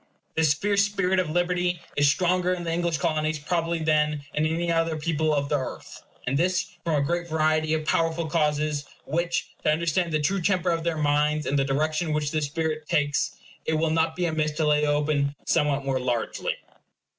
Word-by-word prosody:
This 155 -2 +3
fierce 200 +4 +2
spirit 195 -2 +1
of 180 -4 0
liberty 175 +1 0 0.2
is 145 0 +4
stronger 180 +3 +2
in 175 - -6
the 165 -1 -2
English 170 -1 0
Colonies 155 -2 0
probably 165 +2 -1
than 150 -2 +1
in 155 +1 +1
any 170 +2 -1
other 165 -1 +1
people 155 0 0
of 140 -1 +1
the 145 0 +1
earth, 130 - -7 0.2
and 135 +3 0
this 185 +1 0
from 165 -2 0
a 140 -1 +1
great 175 +2 -1
variety 155 0 +2
of 155 -1 -3
powerful 165 +1 +1
causes; 150 -2 0 0.2
which, 170 +2 -1
to - - +1
understand 170 +2 0
the 155 - +1
true 185 +6 0
temper 180 -1 +1
of 165 -1 -1
their 165 -1 -1
minds 150 0 +1
and 140 +1 +1
the - - +3
direction 155 +3 0
which 150 -1 -1
this 155 -2 0
spirit 155 0 -3
takes, 145 0 +1 0.3
it 160 - +1
will 160 0 +1
not 160 0 +1
be 180 - 0
amiss 155 -2 0
to 155 +1 0
lay 150 0 +3
open 145 -1 +1
somewhat 145 -3 +1
more 135 -1 0
largely. 120 -2 -2
155 Hz, 195 wpm, -26 LUFS, 150-170 Hz, 0.3 s, is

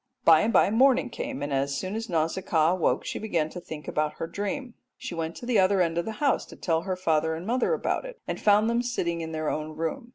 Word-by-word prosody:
By 160 -1 +7
and 225 - +1
by 200 - +4
morning 255 +2 +4
came, 145 - -5
and 145 0 -3
as 140 +1 0
soon 185 +4 -4
as 225 0 -4
Nausicaa 165 0 +1
woke 185 - 0
she - - -4
began 165 -8 -1
thinking 160 -4 -8
about 150 0 -1
her - - -4
dream. 205 +9 -4 0.2
She - - -6
went 165 0 -3
to - - -8
the 240 -4 +2
other 190 +1 +3
end 170 -1 +1
of 170 - -2
the 220 - -4
house 280 +4 +1
to - - -12
tell 165 -2 0
her 185 +1 -2
father 160 -3 +1
and 165 +3 -7
mother 245 +3 +1
all 475 - +3
about - - -2
it, - - -9
and - - -4
found 210 +1 +4
them 235 +1 +2 0.2
in 170 -2 -2
their 155 -1 -2
own 155 0 -4
room. 200 +10 -3
175 Hz, 250 wpm, -27 LUFS, 160-220 Hz, 0.2 s, By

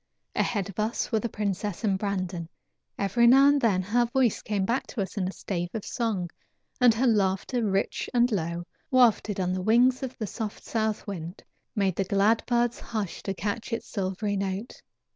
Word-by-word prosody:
Ahead 205 -5 0
of 200 +1 -8
us 220 +2 -1
were 220 - +2
the 235 - -3
princess 205 -1 -3
and 200 -3 +2
Brandon. 185 -4 -3 0.5
Every 220 +5 +3
now 270 +3 +7
and 285 -1 +3
then 195 -6 +2
her 235 +5 +2
voice 245 -2 +1
came 200 -3 -1
back 240 +6 -1
to 220 - -4
us 190 - -8
in 190 -3 -1
a - - -3
stave 175 -3 -4
of 220 - -3
a - - -10
song, 205 -8 -2 0.5
and 250 -2 +7
her 250 +4 +1
laughter, 210 +2 +1
rich 195 -2 -1
and 245 0 +3
low, 170 -3 -2 0.2
wafted 230 -5 +3
on 180 -1 0
the 185 - -2
wings 245 +6 +4
of 260 -2 -5
the 220 - -3
soft 215 +1 -5
south 220 -1 -1
wind, 175 -2 -6 0.3
made 195 -4 +1
the 195 - +2
glad 200 +4 +2
birds 240 -1 +1
hush 215 -6 -4
to 195 - -3
catch 205 +6 -3
its 230 - -2
silvery 200 +1 -2
note. 195 +4 -4
210 Hz, 195 wpm, -27 LUFS, 190-235 Hz, 0.5 s, now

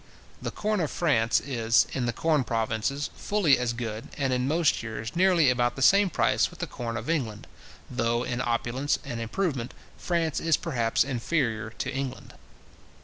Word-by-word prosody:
The - - -3
corn 215 -1 -1
of 160 -4 0
France 120 -9 +2
is, 115 -4 +2
in 125 -2 -1
the - - +1
corn 155 +1 +1
provinces, 115 +5 -1
fully 190 -11 +2
as 125 -1 0
good, 115 -2 -5
and 135 -2 0
in 125 +1 0
most 160 +1 +2
years 110 0 -6
nearly 175 -6 +4
about 120 -1 +1
the 135 - -1
same 200 +3 +6
price - - +2
with - - -14
the - - -3
corn 115 -1 -5
of 110 - -6
England, 125 -11 -2 0.4
though, 120 -1 0
in 125 0 -2
opulence 120 +4 0
and 120 -4 -4
improvement, 125 - -2 0.2
France 165 -3 0
is 165 -3 +2
perhaps 120 -8 +1
inferior 120 -4 -1
to 135 - -3
England. 135 -1 -5
125 Hz, 170 wpm, -27 LUFS, 115-155 Hz, 0.4 s, same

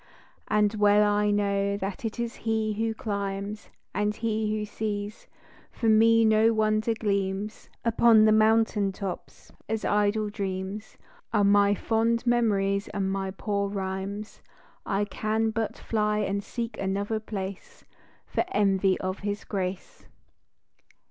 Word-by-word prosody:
And 210 0 +2
well 210 0 +4
I 205 0 +2
know 200 -1 +1
that 195 +1 -5
it 225 +2 -4
is 235 -1 -3
he 220 -1 -1
who 225 +1 -1
climbs 200 0 -4 0.2
And 210 +1 0
he 220 -1 -1
who 210 - -3
sees, 210 0 -5 0.4
for 230 - -1
me 225 +1 +5
no 220 +1 +4
wonder 215 +1 +1
gleams 200 0 -2 0.2
Upon 230 -1 +5
the 215 - +5
mountain 215 -2 +3
tops, 190 -2 -7 0.2
as 220 0 -2
idle 210 +1 +1
dreams 195 0 -5 0.3
Are 210 -2 +3
my 200 0 +4
fond 230 +3 0
memories 200 -5 +1
and 195 -2 -2
my 195 0 -2
poor 200 +1 -2
rhymes; 195 +1 -5 0.5
I 200 +1 +1
can 220 +2 -1
but 225 -1 -2
fly 210 -1 0
and 200 -1 -1
seek 235 +1 -5
another 200 +3 -1
place, 200 -3 -7 0.4
For - - -1
envy 195 - +2
of 185 +1 -3
his 205 0 -3
grace. 185 -2 -5
210 Hz, 135 wpm, -27 LUFS, 200-220 Hz, 0.5 s, me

